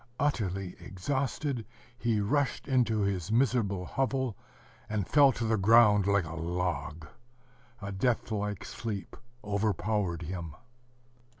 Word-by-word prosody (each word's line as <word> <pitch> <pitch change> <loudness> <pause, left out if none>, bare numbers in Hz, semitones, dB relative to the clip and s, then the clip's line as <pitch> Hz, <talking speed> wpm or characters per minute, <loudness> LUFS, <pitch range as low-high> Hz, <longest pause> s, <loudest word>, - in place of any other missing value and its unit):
Utterly 95 -10 -1
exhausted, 135 - -2 0.3
he 115 -3 0
rushed 140 +6 0
into 120 -5 +2
his 100 -2 -1
miserable 110 -6 +1
hovel, 130 0 -1 0.5
and 105 -3 -1
fell 145 -2 +6
to 120 - -4
the 110 0 +2
ground 105 -1 +6
like 100 -3 +3
a 80 - -7
log. 85 -3 -3 0.8
A 100 - -4
death 115 +4 0
like 105 -2 -2
sleep 105 -4 -5 0.3
overpowered 100 -3 -1
him. 85 -2 -5
105 Hz, 115 wpm, -30 LUFS, 90-120 Hz, 0.8 s, fell